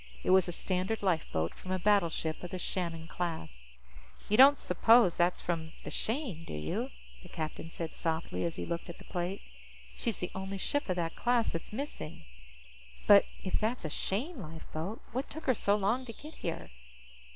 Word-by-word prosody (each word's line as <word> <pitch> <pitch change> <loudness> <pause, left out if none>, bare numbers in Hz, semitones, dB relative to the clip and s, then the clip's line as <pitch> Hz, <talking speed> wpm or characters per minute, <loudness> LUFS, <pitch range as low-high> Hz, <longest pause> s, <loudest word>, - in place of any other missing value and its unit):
It - - +2
was 190 -1 +6
a - - -2
standard 185 +5 -1
lifeboat 160 - +1
from 185 - -11
a 185 - +1
battleship 175 -5 +2
of 180 - -5
the 185 - -4
Shannon 170 -2 -3
class. 80 - -4 0.6
"You 210 - +4
don't 275 +4 +9
suppose 225 -6 +5
that's 175 +1 +2
from 160 -2 -2
the - - -6
Shane, 225 - -2
do - - -7
you?" 75 +1 -2 0.3
the - - -13
captain 160 +1 -4
said 165 -1 -5
softly 165 0 -2
as 170 -1 -1
he - - -3
looked 170 +1 -3
at 170 - -7
the - - -13
plate. 180 +2 -3 0.5
"She's 225 -5 -1
the 180 - -3
only 190 +1 -4
ship 285 +5 -1
of 185 - +2
that 165 -2 -2
class 240 -1 +2
that's 165 - -5
missing. 225 - -5 0.8
But - - +8 0.2
if - - 0
that's 220 -2 -1
a 155 - -2
Shane 250 - -2
lifeboat, 165 +5 -6
what 260 +4 -2
took 315 +2 -7
her 260 - +4
so 205 -2 +3
long 220 +6 +1
to 230 - -6
get 305 +7 -11
here?" 165 - -4
185 Hz, 185 wpm, -32 LUFS, 165-220 Hz, 0.8 s, don't